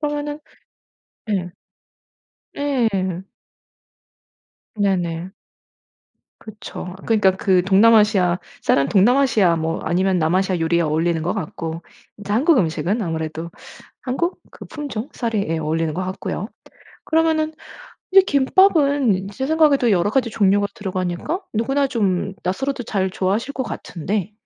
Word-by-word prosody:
그러면은 295 0 -3 0.9
네. 190 -5 -2 1.0
네. 275 -5 0 1.9
네네. 185 -3 -1 1.1
그쵸. 205 -4 -9
그러니까 210 -4 +4
그 185 -3 +2
동남아시아 200 -2 +4 0.2
쌀은 140 0 +2
동남아시아 210 - +3
뭐 160 +1 -2
아니면 185 +2 +1
남아시아 180 +3 +1
요리와 165 0 +1
어울리는 160 +1 0
것 175 - -1
같고 165 +1 -5 0.4
이제 205 0 -5
한국 280 +5 +4
음식은 180 +5 0
아무래도 160 -1 -4 0.5
한국 305 +8 -2
그 - - -12
품종 285 -5 -6
쌀이 225 -4 -2
예 165 0 -1
어울리는 160 +1 -1
것 185 - -2
같고요. 190 +2 -4 0.6
그러면은 315 -1 +1 0.6
이제 390 +1 +8
김밥은 280 - +3
제 265 +7 -4
생각에도 300 -6 +3
여러가지 205 +7 +2
종류가 205 -1 +2
들어가니까 185 - -3
누구나 270 +6 +1
좀 195 -5 -1
낯설어도 265 +8 -2
잘 190 -4 -1
좋아하실 200 +9 -1
것 260 - -2
같은데 195 -1 -4
200 Hz, 280 characters per minute, -21 LUFS, 175-265 Hz, 1.9 s, 이제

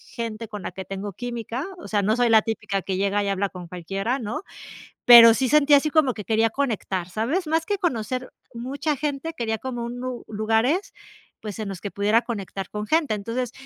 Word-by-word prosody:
gente 230 -2 -5
con 210 -3 -7
la - - -4
que 190 +2 -7
tengo 195 +2 -6
química, 240 - -5
o 345 - -10
sea, 205 -2 +1
no 215 +4 +1
soy 245 - +3
la 220 -1 +6
típica 210 -3 -3
que 190 0 -3
llega 200 +1 +1
y 200 - -1
habla 195 0 0
con 180 -2 -9
cualquiera, 195 +8 -3
¿no? 220 -2 -4 0.6
Pero 235 -1 +10
sí 260 +2 +1
sentía 290 +2 +6
así 305 +2 0
como 300 -5 +3
que 210 - -6
quería 225 0 +2
conectar, 215 -8 -2
¿sabes? 255 - -1
Más 320 +1 0
que 410 -1 0
conocer 255 - -2 0.2
mucha 280 +5 -2
gente, 295 +3 -3
quería 225 -2 -2
como 245 -1 -4
un 245 +1 -6
u 255 -2 -5
lugares, 225 - 0 0.5
pues, 210 0 -7
en 210 - -3
los 195 -3 -6
que 200 - -5
pudiera 210 +4 +2
conectar 195 -4 -5
con 210 0 -4
gente. 315 -6 +2
Entonces, 230 +4 -3
225 Hz, 205 wpm, -24 LUFS, 205-260 Hz, 0.6 s, Pero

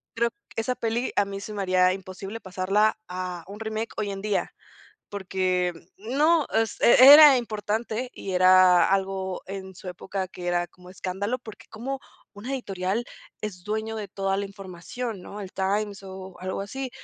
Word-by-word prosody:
creo 235 +1 +2 0.3
Esa 225 +3 0
peli, 235 +1 -1
a 205 - +3
mí 195 0 -6
se 210 +2 -7
me 205 - -3
haría 185 -1 +3
imposible, 195 +3 -7
pasarla 195 +4 +1
a 180 -1 -5
un 205 +2 -9
remake, 220 +1 -4
hoy 210 -2 -1
en 195 0 -6
día. 210 -2 -1 0.6
Porque, 185 -2 -1 0.2
no. 290 - +2
Es 225 0 0
era 280 +3 +10
importante. 225 +2 -3
Y 195 - -6
era 185 -1 +6
algo 190 -1 -1
en 190 0 -7
su 185 - -8
época, 185 +1 -5
que 175 -1 -7
era 175 0 +1
como 180 +1 -17
escándalo, 190 +6 -3
porque, 220 -3 -12
¿cómo 265 +5 -5 0.3
una 210 +6 -7
editorial, 195 -3 -2 0.4
es 185 -4 -6
dueño 220 +1 -2
de 205 -2 -5
toda 195 0 -1
la 200 - -1
información?, 195 +3 -7
¿no? 205 +3 -8
El 190 -2 -8
Times, 200 +1 -1
o 190 -1 -9
algo 185 +1 -3
así. 260 +6 -5
195 Hz, 165 wpm, -26 LUFS, 185-220 Hz, 0.6 s, era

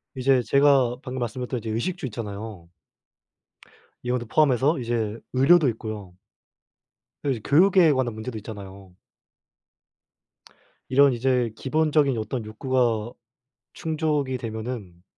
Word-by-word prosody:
이제 130 0 +3
제가 135 0 +3
방금 130 -1 -5
말씀드렸던 125 +1 -3
이제 115 0 -6
의식주 135 +9 -2
있잖아요. 105 -5 -7 1.3
이것도 125 -1 -2
포함해서 145 +3 +3
이제 115 -2 -2
의료도 145 +4 +5
있고요. 110 -5 -6 1.1
여 - - +1
이 125 - -2
교육에 180 +1 +5
관한 130 -4 0
문제도 110 +2 -6
있잖아요. 100 -3 -10 1.9
이런 140 +2 +5
이제 125 -1 +1
기본적인 150 -2 +1
어떤 110 +2 -4
욕구가 115 -1 0 0.6
충족이 150 -5 -1
되면은 110 -6 -6
125 Hz, 270 characters per minute, -24 LUFS, 110-140 Hz, 1.9 s, 의료도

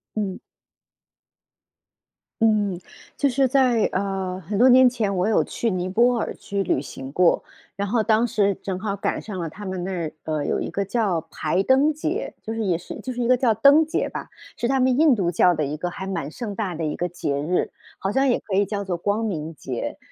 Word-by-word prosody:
嗯。 200 -3 -2 2.0
嗯， 205 -5 +2 0.4
就 280 - +2
是 265 +1 +2
在， 250 -4 +3
呃， 190 -1 -2
很 200 +4 -4
多 250 +5 +6
年 255 0 +7
前， 215 -5 -1
我 185 +3 +1
有 220 - +3
去 230 - -2
尼 185 -1 -2
泊 240 +6 +3
尔 - - -2
去 200 -1 -3
旅 135 - 0
行 135 -1 -8
过， 180 +2 +3 0.3
然 200 +1 -2
后 225 +2 +1
当 220 +2 +3
时 200 -4 +1
正 185 -2 -3
好 200 0 -2
赶 200 - -2
上 205 -4 -7
了 170 - -2
他 195 +6 -10
们 185 -2 -4
那 190 - -3
儿， 170 -4 -3
呃， 155 -2 -2
有 - - 0
一 - - -3
个 200 - -1
叫 195 -5 0
排 175 +5 0
灯 270 +7 +4
节， 325 +9 -3
就 220 - -6
是 225 0 -2
也 180 -3 +2
是 180 - -8
就 255 - -5
是 245 - -3
一 235 - 0
个 255 0 +5
叫 240 -3 +3
灯 280 +8 +6
节 315 - -1
吧， - - -6 0.3
是 240 - 0
他 270 +1 +1
们 255 0 +3
印 310 -3 +6
度 190 -5 0
教 175 +1 +4
的 155 -2 -1
一 150 +2 -3
个 175 +2 -3
还 190 - -6
蛮 165 -6 -3
盛 215 -2 -5
大 200 -6 -2
的 165 - -4
一 150 - -1
个 175 - -1
节 145 -5 -3
日， 170 +5 0 0.3
好 195 - -1
像 270 +4 +2
也 245 - +2
可 195 - -4
以 200 - +3
叫 200 0 -3
做 185 -3 -2
光 205 +5 -1
明 165 -6 -3
节。 130 -5 -5
200 Hz, 240 characters per minute, -23 LUFS, 180-240 Hz, 2.0 s, 年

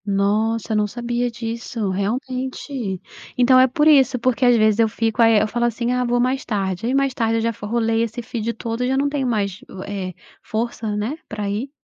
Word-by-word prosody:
Nossa, 215 +3 0
eu - - +1
não 210 0 +2
sabia 240 +2 -2
disso, 230 -3 -4
realmente. 250 +1 -3 0.4
Então 255 +1 +6
é 260 - +6
por 295 +4 +2
isso, 270 -4 +5
porque 255 +1 0
às 245 -1 +6
vezes 215 0 +3
eu 225 - +5
fico, 225 +1 0
aí 225 -1 +6
e - - +6
eu 215 - +1
falo 240 +2 -1
assim: 240 +1 -1
"Ah, 250 0 +1
vou 245 0 +1
mais 255 +2 +1
tarde", 195 0 -2
aí 255 - +1
mais 275 -1 +2
tarde 230 -3 0
eu - - 0
já 230 +1 0
fo 210 -2 -8
rolei 225 0 +1
esse 230 +1 -3
feed 230 -1 -3
todo, 230 +1 -4
e - - +1
já 265 +1 +1
não 285 +1 +2
tenho 280 -3 -1
mais 200 -5 -1
u 190 0 -8
eh, 190 -3 -5 0.3
força, 220 -1 -3
né, 220 +9 -2
pra 210 -1 -4
ir. 225 +7 -3
230 Hz, 230 wpm, -21 LUFS, 215-250 Hz, 0.4 s, Então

